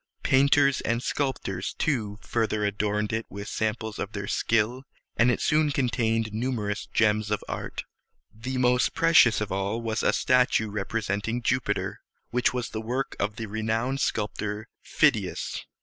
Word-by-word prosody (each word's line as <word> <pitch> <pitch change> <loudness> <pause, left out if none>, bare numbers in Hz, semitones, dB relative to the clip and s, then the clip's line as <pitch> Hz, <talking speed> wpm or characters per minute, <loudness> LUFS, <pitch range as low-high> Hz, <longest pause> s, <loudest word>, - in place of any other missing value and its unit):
Painters 140 0 +4
and 115 +2 -1
sculptors, 125 -10 -2
too, 110 -9 -1
further 110 -2 0
adorned 105 +1 -1
it 110 0 -2
with 100 +1 -7
samples 110 0 -2
of 100 - -4
their 100 -1 -4
skill, 115 +5 +1 0.3
and 120 +2 +4
it 125 - +1
soon 155 0 +2
contained 115 -5 0
numerous 110 -3 -2
gems 110 -1 +2
of 105 - -1
art. - - -5 0.5
The 125 +4 -4
most 125 0 +2
precious 160 -10 +5
of 105 - -3
all 100 +4 -1
was 115 -1 -2
a - - +3
statue 125 -4 +2
representing 105 +2 -2
Jupiter, 120 -5 -1 0.3
which 125 0 +2
was 125 -2 -3
the 110 - -4
work 125 +4 -3
of 105 +1 -1
the 115 - -4
renowned 110 +5 -1
sculptor 105 -3 -2 0.2
Phid´i - - +2
as. - - -5
110 Hz, 150 wpm, -26 LUFS, 105-125 Hz, 0.5 s, precious